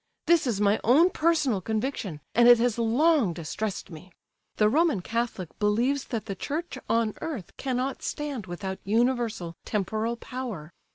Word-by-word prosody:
This 335 -4 +4
is 220 -5 0
my 205 +1 +3
own 310 +11 +5
personal 305 - +1
conviction, 215 - -3
and 240 0 +5
it 240 0 +9
has 235 0 +1
long 240 - +3
distressed 190 +5 -4
me. 170 +3 -11 0.4
The 210 - +4
Roman 300 - +2
Catholic 225 -4 -3
believes 240 +7 +1
that 225 -3 -4
the 200 - -4
Church 305 - -4
on 225 -2 +2
earth 300 - -5
cannot 260 0 -2
stand 280 -9 -4
without 190 +2 -5
universal 230 -4 0
temporal 215 +3 -1
Power. 230 -12 -6
230 Hz, 150 wpm, -27 LUFS, 200-265 Hz, 0.4 s, it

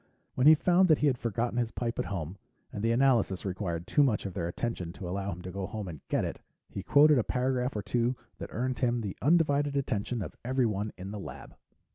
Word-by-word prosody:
When 125 - +3
he 155 - +10
found 180 +4 +4
that 155 -3 +5
he - - 0
had 130 -4 +2
forgotten 120 +1 -1
his 120 -2 0
pipe 115 +1 -3
at 125 - 0
home, 90 -1 -5 0.3
and 105 - -4
the 115 +1 +2
analysis 115 -7 +2
required 90 -3 -3
too 145 - +2
much 125 -9 +2
of 95 - -4
their 85 -2 -2
attention 90 -2 -3
to 90 - -7
allow 100 +2 -3
him 90 +1 -8
to 90 - -6
go 95 0 -4
home 105 -1 -5
and 80 -6 -8
get - - +1
it, - - -5 0.3
he 100 - -6
quoted 145 +5 +5
a - - +2
paragraph 125 +1 -1
or 105 - -2
two 120 +1 0 0.2
that - - -6
earned 125 +2 -2
him 120 -2 +1
the 100 -4 -4
undivided 145 -2 +3
attention 115 -3 -1
of - - -8
everyone 115 -5 0
in 95 +2 -7
the 105 - -5
lab. - - -9
115 Hz, 230 wpm, -29 LUFS, 95-130 Hz, 0.3 s, he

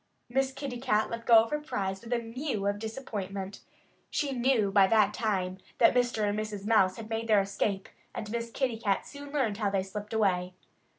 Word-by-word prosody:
Miss 265 +2 +1
Kitty 270 -2 -5
Cat 215 -4 +1
let 230 0 -5
go 225 -2 +8
of 225 - -8
her 300 - 0
prize 195 -10 -3
with 235 - -9
a 245 - +3
mew 235 -1 -3
of 200 0 0
disappointment. 205 -4 -5 0.5
She 285 -2 -1
knew 255 -1 +2
that 200 -1 0
by 195 -2 +6
that 220 +1 +4
time 190 -5 -1 0.2
Mr. 240 -3 +3
and 205 +1 0
Mrs. 210 -2 -5
Mouse 195 -4 +3
had 225 -1 -7
made 225 0 -3
their 210 -3 +5
escape. 195 0 -2 0.3
And 210 -1 -5
Miss 235 0 -3
Kitty 240 -2 -2 0.2
soon 285 0 -10
learned 250 -9 0
how 210 -2 0
they 195 -1 0
slipped 210 +3 -7
away. 185 -4 +1
220 Hz, 195 wpm, -29 LUFS, 200-240 Hz, 0.5 s, go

